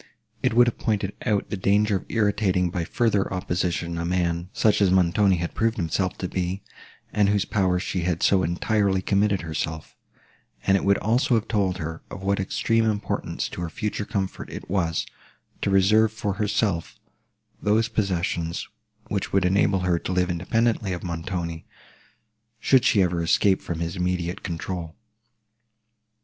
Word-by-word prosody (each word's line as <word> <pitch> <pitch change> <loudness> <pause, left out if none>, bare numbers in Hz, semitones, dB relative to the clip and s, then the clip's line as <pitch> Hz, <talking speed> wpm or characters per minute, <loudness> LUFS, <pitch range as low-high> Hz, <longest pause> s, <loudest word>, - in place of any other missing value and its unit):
It - - +1
would 120 +1 +7
have 120 - -2
pointed 100 -3 -1
out 105 -2 0
the - - 0
danger 100 +2 +2
of - - -11
irritating 100 -5 +1
by 85 -2 -2
further 105 -1 +1
opposition 85 -2 -2
a - - -2
man, 85 0 -1
such 105 0 +2
as 100 - +5
Montoni 95 +2 +3
had 85 -1 -3
proved 115 +1 0
himself 90 +1 -1
to 90 - -3
be, 90 +2 -3 0.5
and 105 -2 +3
to 100 - +3
whose 100 -1 +1
power 95 -3 +1
she 90 0 -2
had 85 -1 -1
so 95 -2 +4
entirely 95 +3 +1
committed 100 0 +2
herself; 80 -1 -4 0.7
and 95 - +4
it 95 - +1
would 100 0 +4
also 120 +3 +2
have 110 -1 0
told 100 -5 0
her, 80 -1 -5
of 95 - -8
what 100 0 +1
extreme 115 +4 +1
importance 105 -2 -2
to - - -7
her 85 - -3
future 105 +4 -3
comfort 100 -3 -3
it - - -8
was, 85 -4 0 0.6
to - - 0
reserve 105 +3 +4
for 105 -2 -2
herself 105 -5 0 0.6
those 110 +2 +2
possessions, 90 -6 -1 0.4
which - - -2
would 95 -1 +2
enable 95 +1 +2
her 90 -2 +1
to - - -4
live 90 0 +1
independently 110 +3 0
of 85 - -6
Montoni, 85 -1 -4 0.9
should 130 +2 +4
she 100 -4 +4
ever 85 -1 0
escape 95 +3 +3
from 85 -2 -4
his 85 +2 -3
immediate 90 -1 -1
control. 85 -2 -5
95 Hz, 165 wpm, -24 LUFS, 85-105 Hz, 0.9 s, would